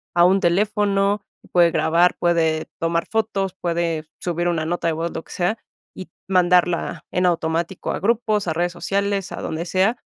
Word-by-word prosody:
a 175 Hz, -, +5 dB
un 190 Hz, +2 st, +4 dB
teléfono, 200 Hz, +2 st, +1 dB, 0.3 s
puede 175 Hz, -1 st, +5 dB
grabar, 170 Hz, +3 st, +3 dB
puede 160 Hz, -2 st, +1 dB
tomar 165 Hz, 0 st, 0 dB
fotos, 200 Hz, -4 st, -1 dB
puede 170 Hz, -2 st, -1 dB, 0.2 s
subir 175 Hz, 0 st, -1 dB
una 165 Hz, -3 st, 0 dB
nota 170 Hz, +1 st, -1 dB
de 165 Hz, -, +1 dB
voz, 165 Hz, +2 st, -3 dB
lo -, -, -5 dB
que -, -, -17 dB
sea, 180 Hz, +5 st, 0 dB, 0.4 s
y 185 Hz, -, -9 dB, 0.2 s
mandarla 180 Hz, -2 st, +2 dB
en 180 Hz, -, +1 dB
automático 170 Hz, +1 st, -1 dB
a -, -, -3 dB
grupos, 215 Hz, -1 st, +1 dB
a 160 Hz, -, 0 dB
redes 175 Hz, +2 st, 0 dB
sociales, 200 Hz, +2 st, -2 dB
a -, -, -6 dB
donde 160 Hz, +2 st, -4 dB
sea, 190 Hz, +7 st, +1 dB
175 Hz, 170 wpm, -22 LUFS, 170-195 Hz, 0.4 s, a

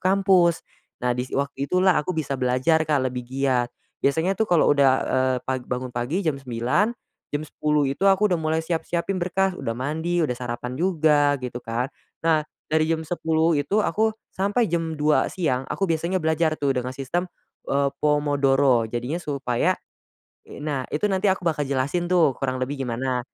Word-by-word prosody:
kampus. 185 Hz, -3 st, +3 dB, 0.4 s
Nah, 125 Hz, -, +3 dB
dis 125 Hz, +1 st, -3 dB
waktu 140 Hz, 0 st, -2 dB
itulah 185 Hz, +1 st, +4 dB
aku 170 Hz, +3 st, -4 dB
bisa 140 Hz, -4 st, -2 dB
belajar 130 Hz, +6 st, +2 dB
Kak, 150 Hz, -, +3 dB
lebih 125 Hz, -1 st, -2 dB
giat. 130 Hz, -2 st, +1 dB, 0.3 s
Biasanya 160 Hz, +7 st, +2 dB
tuh 215 Hz, +3 st, -1 dB
kalo 175 Hz, -3 st, +4 dB
udah 140 Hz, -2 st, +5 dB, 0.2 s
eee, 130 Hz, 0 st, +2 dB
pag 130 Hz, 0 st, -1 dB
bangun 125 Hz, 0 st, -3 dB
pagi 130 Hz, +11 st, -2 dB
jam 145 Hz, -4 st, -1 dB
9.00, 125 Hz, -, 0 dB, 0.4 s
jam 145 Hz, +1 st, -3 dB
10.00 150 Hz, -1 st, 0 dB
itu 140 Hz, +9 st, +1 dB
aku 195 Hz, 0 st, +3 dB
udah 170 Hz, -, +1 dB
mulai 160 Hz, +1 st, 0 dB
siap-siapin 170 Hz, +3 st, -2 dB
berkas, 190 Hz, +2 st, +1 dB
udah 115 Hz, 0 st, -3 dB
mandi, 160 Hz, +6 st, -1 dB
udah 135 Hz, -, 0 dB
sarapan 125 Hz, 0 st, -5 dB
juga, 150 Hz, -3 st, +3 dB
gitu 125 Hz, -2 st, -6 dB
kan. 120 Hz, +5 st, -3 dB, 0.3 s
Nah, 160 Hz, -2 st, +4 dB, 0.2 s
dari 155 Hz, 0 st, +1 dB
jam 160 Hz, -1 st, 0 dB
10.00 160 Hz, 0 st, +1 dB
itu 170 Hz, +9 st, -1 dB
aku, 220 Hz, +1 st, +2 dB, 0.2 s
sampai 205 Hz, +5 st, +1 dB
jam 165 Hz, -2 st, -1 dB
2.00 150 Hz, 0 st, +2 dB
siang 135 Hz, -8 st, -1 dB
aku 195 Hz, -, -1 dB
biasanya 170 Hz, +1 st, 0 dB
belajar 160 Hz, -2 st, +1 dB
tuh, 140 Hz, -2 st, +2 dB
dengan 125 Hz, 0 st, -2 dB
sistem, 135 Hz, +7 st, -2 dB, 0.4 s
eee, 140 Hz, 0 st, +2 dB
pomodoro 140 Hz, -4 st, +3 dB
jadinya 120 Hz, +7 st, -3 dB
supaya. 140 Hz, -7 st, 0 dB, 0.8 s
I -, -, -10 dB
nah 140 Hz, -4 st, -1 dB
itu 155 Hz, +7 st, -2 dB
nanti 190 Hz, +2 st, +2 dB
aku 185 Hz, -1 st, -2 dB
bakal 155 Hz, -3 st, +1 dB
jelasin 140 Hz, +6 st, -1 dB
tuh, 170 Hz, -6 st, +4 dB
kurang 130 Hz, -1 st, -2 dB
lebih 135 Hz, +2 st, -3 dB
gimana, 125 Hz, +2 st, -1 dB
150 Hz, 170 wpm, -24 LUFS, 130-170 Hz, 0.8 s, udah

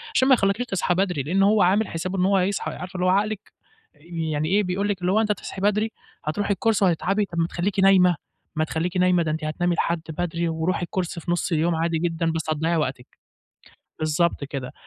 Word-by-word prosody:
عشان 260 Hz, -, +4 dB
ما 270 Hz, -, +7 dB
يخليكيش 200 Hz, +1 st, +2 dB
تصحي 195 Hz, -5 st, 0 dB
بدري، 180 Hz, -7 st, 0 dB
لأن 190 Hz, +7 st, +1 dB
هو 210 Hz, +1 st, +4 dB
عامل 195 Hz, +4 st, +3 dB
حسابه 185 Hz, +4 st, -4 dB
إن 180 Hz, -, +3 dB
هو 195 Hz, 0 st, +3 dB
هيصحى 190 Hz, +2 st, 0 dB
عارفة 180 Hz, +1 st, -8 dB
اللي 180 Hz, -, 0 dB
هو -, -, +4 dB
عقلِك 205 Hz, +2 st, 0 dB, 0.4 s
آآ، -, -, -27 dB
يعني 160 Hz, -3 st, -2 dB
إيه، 205 Hz, +3 st, +3 dB
بيقول 195 Hz, +2 st, -1 dB
لِك 195 Hz, -2 st, -2 dB
اللي 180 Hz, +1 st, +1 dB
هو 215 Hz, +3 st, +3 dB
أنتِ 215 Hz, -, +1 dB
هتصحي 195 Hz, -1 st, -5 dB
بدري 210 Hz, +2 st, +1 dB, 0.3 s
هترُوحي 200 Hz, +7 st, 0 dB
الكورس 210 Hz, +2 st, +1 dB
وهتتعبي 195 Hz, +3 st, +2 dB
طَب 170 Hz, -3 st, -9 dB
ما 165 Hz, -, +2 dB
تخلّيكِ 190 Hz, +4 st, -2 dB
نايمة، 190 Hz, -2 st, +5 dB, 0.4 s
ما 155 Hz, -, +1 dB
تخلّيكِ 165 Hz, +3 st, -2 dB
نايمة، 180 Hz, -1 st, +3 dB
ده 155 Hz, -, -1 dB
أنتِ 155 Hz, +1 st, -3 dB
هتنامي 175 Hz, +3 st, 0 dB
لحد 170 Hz, 0 st, 0 dB
بدري 170 Hz, +1 st, -2 dB
ورُوحي 160 Hz, +3 st, -1 dB
الكورس 175 Hz, -1 st, -3 dB
في 170 Hz, +1 st, -4 dB
نُص 175 Hz, -, -1 dB
اليوم 165 Hz, +1 st, +1 dB
عادي 165 Hz, 0 st, 0 dB
جدًا 165 Hz, -1 st, 0 dB
بس 160 Hz, -1 st, -3 dB
هتضيَّعي 160 Hz, +2 st, 0 dB
وقتِك، 130 Hz, -5 st, -2 dB, 0.9 s
بالضبط 155 Hz, 0 st, +1 dB
كده. 135 Hz, -3 st, -6 dB
180 Hz, 215 wpm, -24 LUFS, 165-195 Hz, 0.9 s, ما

